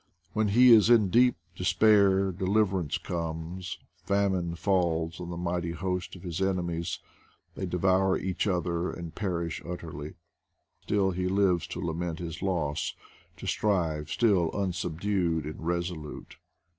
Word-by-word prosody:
When 110 Hz, -1 st, +1 dB
he 120 Hz, +5 st, +6 dB
is 110 Hz, -1 st, +7 dB
in 110 Hz, -6 st, +5 dB, 0.4 s
despair 100 Hz, 0 st, +4 dB
deliver 95 Hz, +1 st, +1 dB
ance 80 Hz, -5 st, -2 dB
comes; 85 Hz, +1 st, -4 dB, 0.3 s
famine 95 Hz, -4 st, 0 dB
falls 85 Hz, -3 st, 0 dB
on 85 Hz, -, -6 dB
the 85 Hz, -, -5 dB
mighty 85 Hz, -1 st, -2 dB
host 90 Hz, +2 st, -3 dB
of 90 Hz, -, -12 dB
his 90 Hz, 0 st, -4 dB
enemies; 85 Hz, -3 st, -1 dB, 0.6 s
they 95 Hz, -, -4 dB
devour 95 Hz, +2 st, +2 dB
each 95 Hz, +2 st, -2 dB
other 85 Hz, -2 st, 0 dB
and 85 Hz, -2 st, -7 dB
perish 85 Hz, -5 st, -3 dB
ut 90 Hz, 0 st, -5 dB
terly. 75 Hz, -2 st, -7 dB, 0.7 s
Still 100 Hz, -2 st, +1 dB
he 90 Hz, 0 st, -2 dB
lives 95 Hz, -3 st, +2 dB
to -, -, -6 dB
lament 85 Hz, 0 st, -3 dB
his 85 Hz, -2 st, -6 dB
loss; 85 Hz, -7 st, -1 dB, 0.4 s
to -, -, -9 dB
strive 80 Hz, -8 st, 0 dB
still, 95 Hz, -4 st, +3 dB
unsubdued 90 Hz, -3 st, -1 dB
and 80 Hz, +2 st, -6 dB
resolute. 85 Hz, -3 st, -4 dB
90 Hz, 135 wpm, -28 LUFS, 85-95 Hz, 0.7 s, is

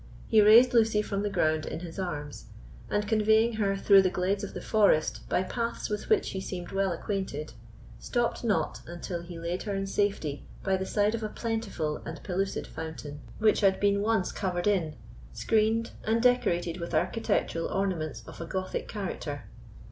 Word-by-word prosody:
He 220 Hz, -1 st, +5 dB
raised 230 Hz, +4 st, +7 dB
Lucy 220 Hz, -2 st, +4 dB
from 200 Hz, -1 st, -2 dB
the 205 Hz, -, -1 dB
ground 155 Hz, -4 st, +1 dB
in -, -, -5 dB
his 175 Hz, +1 st, -7 dB
arms, 150 Hz, -6 st, -5 dB, 0.4 s
and 205 Hz, 0 st, 0 dB
conveying 220 Hz, +2 st, +3 dB
her 195 Hz, -1 st, +1 dB
through 195 Hz, 0 st, +6 dB
the 185 Hz, -, +2 dB
glades 190 Hz, +3 st, -1 dB
of 200 Hz, -, -6 dB
the -, -, -3 dB
forest 200 Hz, -8 st, +2 dB
by 185 Hz, -, +2 dB
paths 230 Hz, +2 st, -3 dB
with 210 Hz, -, -3 dB
which 435 Hz, -3 st, +2 dB
he 190 Hz, -, -4 dB
seemed 180 Hz, -2 st, -6 dB
well 195 Hz, -1 st, +1 dB
acquainted, 170 Hz, -4 st, -3 dB, 0.5 s
stopped 240 Hz, 0 st, -1 dB
not 220 Hz, -4 st, 0 dB
until 175 Hz, 0 st, -5 dB
he 170 Hz, 0 st, -9 dB
laid 170 Hz, +2 st, -3 dB
her 205 Hz, -2 st, -3 dB
in 195 Hz, 0 st, -1 dB
safety 195 Hz, -8 st, -1 dB, 0.2 s
by 195 Hz, -, +2 dB
the 190 Hz, 0 st, -3 dB
side 210 Hz, +1 st, +2 dB
of 230 Hz, -, -2 dB
a 215 Hz, -, -3 dB
plentiful 210 Hz, -10 st, -2 dB
and 160 Hz, -, -8 dB
pellucid 195 Hz, +1 st, -2 dB
fountain, 155 Hz, -2 st, -7 dB, 0.2 s
which 215 Hz, 0 st, +3 dB
had 195 Hz, -2 st, +3 dB
been 200 Hz, 0 st, +2 dB
once 210 Hz, -3 st, +1 dB
covered 180 Hz, -3 st, -2 dB
in, 175 Hz, -7 st, +1 dB, 0.4 s
screened 225 Hz, -, +1 dB
and 225 Hz, +2 st, +1 dB
decorated 185 Hz, -9 st, +2 dB
with 170 Hz, -, -4 dB
architectural 165 Hz, -6 st, 0 dB
ornaments 180 Hz, -6 st, -2 dB
of -, -, -10 dB
a 165 Hz, -, -5 dB
Gothic 185 Hz, +2 st, -3 dB
character. 175 Hz, -8 st, -5 dB
195 Hz, 180 wpm, -28 LUFS, 175-215 Hz, 0.5 s, raised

